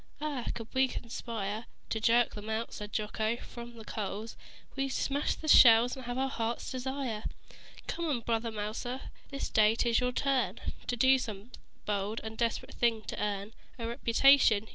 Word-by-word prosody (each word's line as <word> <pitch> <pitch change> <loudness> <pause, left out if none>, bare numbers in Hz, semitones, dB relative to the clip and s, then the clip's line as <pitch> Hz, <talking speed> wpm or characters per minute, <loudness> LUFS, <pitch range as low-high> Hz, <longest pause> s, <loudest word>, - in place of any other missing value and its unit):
"Ah! 290 -5 -3
Could 230 -2 -6
we 265 0 +4
conspire 225 -3 -5 0.2
To 220 - 0
jerk 235 +2 +3
them 210 +1 -7
out," 220 +1 -2
said 210 0 -7
Jocko, 215 +1 -1
"from 240 0 -10
the 225 -1 -11
coals, 210 +2 -4 0.4
We'd 270 0 -1
smash 275 +2 0
the 315 - -8
shells 240 -4 +8
and 260 -2 -9
have 245 +1 -3
our 265 +1 +1
heart's 230 -3 -3
desire. 260 -4 -3 0.6
"Come, 310 -8 -1
Brother 230 0 -1
Mouser! 220 +5 -4 0.2
This 275 -1 -3
day 215 0 +4
'tis 235 0 +2
your 250 0 +1
turn 270 +1 0 0.3
To 245 - 0
do 260 +2 +5
some 215 -1 -6 0.3
bold 205 +1 -1
and 220 0 -6
desperate 230 0 -1
thing 230 -2 +1
to 205 - -4
earn 205 +1 -3 0.2
A 230 -2 -4
reputation. 235 -2 +4
230 Hz, 165 wpm, -31 LUFS, 220-260 Hz, 0.6 s, shells